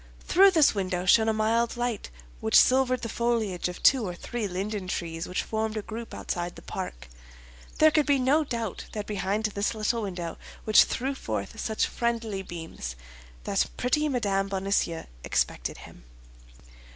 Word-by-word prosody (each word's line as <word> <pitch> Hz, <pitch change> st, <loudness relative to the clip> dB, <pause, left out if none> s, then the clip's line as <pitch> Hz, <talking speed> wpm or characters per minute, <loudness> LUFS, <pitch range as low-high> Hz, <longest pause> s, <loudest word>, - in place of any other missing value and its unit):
Through 390 Hz, +2 st, +6 dB
this 320 Hz, -6 st, +5 dB
window 185 Hz, -3 st, -2 dB
shone 220 Hz, +4 st, +5 dB
a -, -, +4 dB
mild 225 Hz, +2 st, +1 dB
light 240 Hz, -3 st, -2 dB, 0.3 s
which 110 Hz, -, +4 dB
silvered 255 Hz, -1 st, +4 dB
the -, -, -1 dB
foliage 225 Hz, -6 st, -1 dB
of 180 Hz, -, -9 dB
two 260 Hz, -3 st, +6 dB
or 180 Hz, -4 st, -4 dB
three 225 Hz, +4 st, -4 dB
linden 195 Hz, +1 st, -3 dB
trees 165 Hz, -2 st, -3 dB
which 180 Hz, -, -2 dB
formed 220 Hz, 0 st, -2 dB
a 215 Hz, -, -3 dB
group 230 Hz, +1 st, -7 dB
outside 175 Hz, 0 st, -4 dB
the -, -, -12 dB
park. -, -, -6 dB, 0.7 s
There 310 Hz, 0 st, +6 dB
could 305 Hz, -1 st, +2 dB
be 285 Hz, -1 st, +4 dB
no 270 Hz, +5 st, +3 dB
doubt 230 Hz, -8 st, -4 dB
that 210 Hz, -1 st, -4 dB
behind 205 Hz, +1 st, -1 dB
this 215 Hz, +1 st, -1 dB
little 220 Hz, +2 st, 0 dB
window, 175 Hz, -5 st, -5 dB, 0.2 s
which 215 Hz, -, +6 dB
threw 265 Hz, +3 st, -2 dB
forth -, -, -5 dB
such 220 Hz, -1 st, 0 dB
friendly 230 Hz, -4 st, -2 dB
beams, 165 Hz, -, -7 dB, 0.5 s
the 195 Hz, -, +2 dB
pretty 300 Hz, +5 st, +1 dB
Mme. 200 Hz, -7 st, 0 dB
Bonacieux 195 Hz, -4 st, -1 dB, 0.2 s
expected -, -, -1 dB
him. -, -, -15 dB
215 Hz, 165 wpm, -27 LUFS, 190-240 Hz, 0.7 s, Through